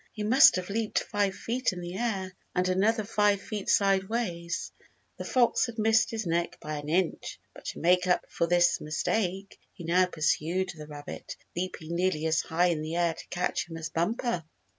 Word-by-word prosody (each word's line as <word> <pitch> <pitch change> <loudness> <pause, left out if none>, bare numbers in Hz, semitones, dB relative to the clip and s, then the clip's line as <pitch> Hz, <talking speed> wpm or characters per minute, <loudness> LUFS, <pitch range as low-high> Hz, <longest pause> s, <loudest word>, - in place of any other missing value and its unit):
He 215 - -4
must 245 +6 +7
have 185 +1 -3
leaped 220 0 -1
five 200 -2 0
feet 250 +3 -1
in 180 - -6
the 175 +1 -6
air, 195 -4 -2 0.2
and 180 0 +2
another 210 +5 +2
five 205 -1 +2
feet 205 0 -5
sideways. 190 -3 0 0.5
The - - -6
fox 250 -1 +3
had 235 -1 -8
missed 220 +1 +3
his 220 -2 -3
neck 170 0 -1
by 155 0 -5
an 145 0 -6
inch, 175 +1 -1
but - - -14
to - - -5
make 180 +2 +3
up 180 - +2
for 170 - -1
this 175 0 +3
mistake, 190 +5 -2
he 175 - -10
now 180 +2 +3
pursued 170 +3 0
the 150 -1 -9
rabbit, 145 -1 -8 0.2
leaping 170 -2 -4
nearly 175 -3 0
as 160 0 +2
high 175 +2 +1
in 160 -3 -1
the 155 +2 -4
air 170 -1 +2
to - - -11
catch 175 -1 -2
him 165 - -6
as 165 0 -5
Bumper. 180 +3 -1
180 Hz, 190 wpm, -28 LUFS, 170-210 Hz, 0.5 s, must